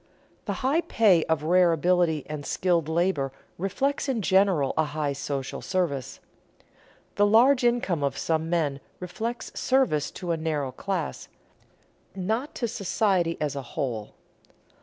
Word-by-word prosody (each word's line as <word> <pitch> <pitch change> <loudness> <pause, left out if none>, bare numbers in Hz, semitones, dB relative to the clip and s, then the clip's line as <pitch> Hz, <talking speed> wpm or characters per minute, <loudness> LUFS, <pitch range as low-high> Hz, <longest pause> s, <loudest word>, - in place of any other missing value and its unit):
The - - -3
high 295 +6 +3
pay 200 - +3
of 160 -2 0
rare 175 +2 +4
ability 165 -2 +2
and 150 -1 -5
skilled 170 -1 0
labor 160 -5 +1 0.3
reflects 270 +10 -1
in 235 -6 -1
general 190 -8 +3
a 160 - +3
high 150 -1 -2
social 140 -1 -4
service. 170 -9 -2 1.0
The 205 - +5
large 245 +5 +5
income 235 - +1
of 140 - -1
some 160 0 -1
men 155 -5 0 0.2
reflects 225 +7 -5
service 255 - +1
to 175 -2 -3
a 165 - 0
narrow 150 -4 -2
class, 175 +3 -4 0.9
not 220 +9 -2
to 235 - -1
society 195 -5 0
as 150 -2 -2
a 140 - -3
whole. 120 -4 -4
175 Hz, 140 wpm, -26 LUFS, 150-205 Hz, 1.0 s, The